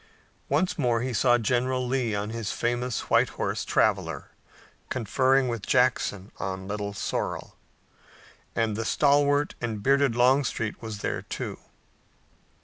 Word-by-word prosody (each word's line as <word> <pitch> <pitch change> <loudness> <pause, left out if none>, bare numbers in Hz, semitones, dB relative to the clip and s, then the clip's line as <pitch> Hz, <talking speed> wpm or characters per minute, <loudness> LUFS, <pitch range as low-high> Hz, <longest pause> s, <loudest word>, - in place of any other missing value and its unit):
Once 185 -1 +1
more 120 -4 +2
he 130 -1 -2
saw 120 +3 +4
General 125 +2 0
Lee 125 -4 0
on 105 +1 -3
his 115 -2 -3
famous 120 0 -1
white - - +4
horse, - - -2
Traveler, - - 0 0.6
conferring 130 +3 +2
with 115 -3 -2
Jackson 115 -5 +1
on 95 0 -4
Little 105 0 -3
Sorrel. - - -3 1.0
And 115 -2 0
the 115 - -2
stalwart 145 +3 +3
and 110 -4 -3
bearded 140 -2 +3
Longstreet 125 -3 +2
was 110 -3 -6
there, - - -2
too. - - -5
120 Hz, 130 wpm, -27 LUFS, 110-130 Hz, 1.0 s, saw